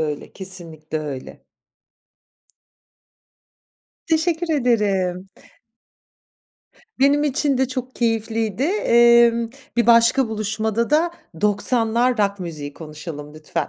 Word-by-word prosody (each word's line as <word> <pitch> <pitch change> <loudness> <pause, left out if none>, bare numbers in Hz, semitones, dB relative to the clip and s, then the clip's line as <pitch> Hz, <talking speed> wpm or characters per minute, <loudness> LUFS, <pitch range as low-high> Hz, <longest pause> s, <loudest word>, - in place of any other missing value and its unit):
öyle, 150 -2 -4
kesinlikle 165 -5 -5
öyle. 145 -4 -7 2.6
Teşekkür 330 +1 0
ederim. 195 -8 0 1.7
Benim 285 +2 +3
için 285 -1 0
de 265 -1 +1
çok 255 0 -5
keyifliydi. 225 -1 -1
Emm, 235 - +4 0.3
bir 235 -1 +2
başka 235 +2 +5
buluşmada 220 +2 -2
da 320 +3 +3 0.3
90'lar 230 +3 +1
rock 200 -1 0
müziği 150 -5 -6
konuşalım 150 -1 -9
lütfen. 155 0 -4
225 Hz, 90 wpm, -21 LUFS, 180-250 Hz, 2.6 s, başka